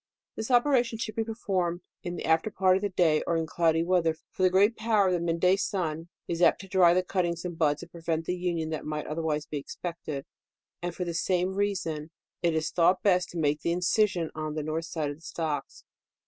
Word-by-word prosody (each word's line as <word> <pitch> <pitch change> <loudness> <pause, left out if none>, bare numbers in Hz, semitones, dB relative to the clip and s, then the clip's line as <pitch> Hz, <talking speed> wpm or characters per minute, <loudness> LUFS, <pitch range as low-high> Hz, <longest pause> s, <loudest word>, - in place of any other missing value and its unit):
"This 220 - -4
operation 245 -2 +3
should 215 -1 -4
be 225 - 0
performed 185 -6 -2 0.2
in 175 0 -4
the - - -5
DEOfcMBER. - - -3
20S - - +3
Alter 215 - -5
part 185 -2 +3
of 190 - 0
the 205 - 0
day, 170 -5 +3
or 170 - +2
in 165 - 0
cloudy 165 0 +2
weather, 170 -2 +2 0.2
for - - -7
the 185 - +6
great 200 +5 +4
power 215 -2 +2
of - - +1
the 175 - +1
mid 170 0 -1
day 180 +2 +5
sun 170 -5 -2 0.2
is 170 0 -2
apt - - +5
to 195 - -11
dry 180 -2 +5
the 185 - +2
cuttings 175 -2 -1
and 175 -1 -4
buds, 150 -1 +1
and 175 - -13
prevent 165 -1 -2
the 180 - -1
union 170 -3 -2
that 155 - -3
might 150 0 -3
otherways 155 -1 -2
be 150 -1 -4
expected; 155 -2 -6 0.6
and 175 -1 -4
for 180 - -3
the 170 - -3
same 180 +2 0
reason 180 -6 -2 0.3
it 170 -2 +1
is 160 0 -1
thought 180 +2 +3
best 180 -3 +3
to 175 - -7
make 150 -2 +1
the 170 - 0
incision 180 -1 +1
on 155 -1 -4
the 155 - -2
norlh 155 +2 -2
side 155 -3 -3
of 145 - -8
the - - -24
stocks. 155 -4 -4
175 Hz, 235 wpm, -28 LUFS, 160-185 Hz, 0.6 s, the